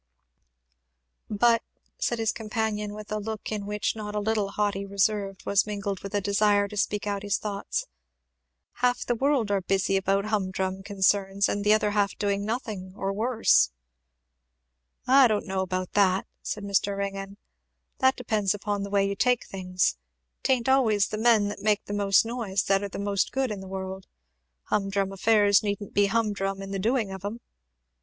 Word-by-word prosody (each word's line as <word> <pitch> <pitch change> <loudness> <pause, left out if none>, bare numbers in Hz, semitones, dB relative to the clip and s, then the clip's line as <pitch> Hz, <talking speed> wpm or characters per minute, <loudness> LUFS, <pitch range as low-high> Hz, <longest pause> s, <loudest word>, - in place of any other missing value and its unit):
"But," 230 +2 +3 0.4
said 240 - 0
his 225 -1 +1
companion, 215 -2 -3
with 215 0 -9
a 215 - -1
look 220 0 -5
in 205 -2 -3
which 210 +1 -1
not 210 -1 -6
a - - +1
little 210 -1 0
haughty 200 -1 -1
reserve 200 0 0
was 200 +1 +2
mingled 200 -2 -3
with 200 +1 -6
a 205 - +1
desire 205 +1 +2
to 210 - -8
speak 205 0 -1
out 200 -1 -2
his 205 0 0
thoughts, 200 -2 -3 1.0
"half 245 0 +2
the 245 - +1
world 260 -3 +1
are 200 -1 +1
busy 195 +1 +1
about 195 +1 +1
hum 210 -3 0
drum 190 0 -3
concerns 195 0 +1
and 205 - -2
the 210 - +3
other 215 -1 +2
half 205 -1 0
doing 200 -1 0
nothing, 215 -4 -4
or 195 0 -2
worse." 220 - +3 1.4
"I 265 0 +7
don't 215 -2 -1
know 190 0 -1
about 185 -1 -3
that," 190 -2 +3 0.2
said 210 - -4
Mr. 200 0 0
Ringgan; 195 0 -4 0.6
"that 260 0 +4
depends 215 -5 0
upon 205 0 -2
the 200 - -4
way 200 -1 +2
you 200 - -2
take 250 +3 +2
things. 185 - -1 0.4
'Tain't 255 -3 +1
always 225 -6 +3
the 215 - -3
men 220 -3 +4
that 205 - -6
make 210 -1 +1
the 205 - -5
most 200 0 +3
noise 225 -5 -1
that 195 0 +2
are 200 - -4
the - - -7
most 200 0 0
good 265 -3 -1
in 205 - -4
the 190 - -9
world. 190 0 -6 0.6
Hum 195 -2 -1
drum 195 0 -1
affairs 205 0 +4
needn't 205 -1 -4
be 205 0 +4
hum 220 0 +1
drum 195 0 -3
in 195 - -7
the 195 - -2
doing 225 0 0
of 190 -1 -8
'em. 210 +4 -4
205 Hz, 185 wpm, -26 LUFS, 195-215 Hz, 1.4 s, I